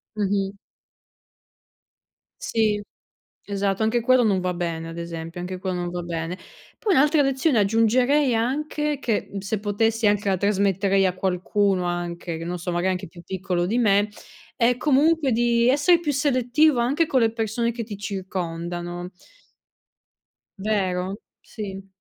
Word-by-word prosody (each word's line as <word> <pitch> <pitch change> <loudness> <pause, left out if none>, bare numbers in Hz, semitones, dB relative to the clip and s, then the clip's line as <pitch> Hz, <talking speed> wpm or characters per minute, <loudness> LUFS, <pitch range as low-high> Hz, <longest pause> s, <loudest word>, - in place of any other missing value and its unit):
Mh-mh. 200 -1 -1 1.8
Sì, 220 - +1 0.6
esatto, 200 0 -1
anche 225 +2 +2
quello 255 +1 +4
non 200 -4 +2
va 180 0 -1
bene, 165 -2 -3
ad 165 +1 -8
esempio, 170 0 -6
anche 185 +1 -5
quello 185 -1 -3
non 175 - -3
va 175 0 -4
bene. 170 +1 -4 0.4
Poi 415 -4 +1
un'altra 295 +1 +4
lezione 270 -1 +2
aggiungerei 245 +6 +3
anche 295 +5 -1
che, 225 -5 -1
se 200 +2 -3
potessi 220 +2 +1
anche 205 -1 +1
la 190 - +2
trasmetterei 195 0 +2
a 185 - +1
qualcuno 190 +1 0
anche 175 -1 -3
che 165 - -6
non 175 +1 -3
so, 175 +1 -4
magari 175 +2 +1
anche 185 +1 -4
più 170 +1 -13
piccolo 180 -1 -2
di 215 +7 0
me, 205 -3 +3 0.5
è 240 +1 +2
comunque 295 0 +3
di 235 +1 +2
essere 295 +6 +4
più 300 -4 -1
selettivo 270 +1 +2
anche 285 +7 +2
con 265 - +2
le 225 -2 +2
persone 230 +1 -1
che 235 - -4
ti 210 -2 -7
circondano. 175 -3 -4 1.5
Vero? 190 -2 -1 0.2
Sì. 195 -3 -8
205 Hz, 145 wpm, -24 LUFS, 180-240 Hz, 1.8 s, quello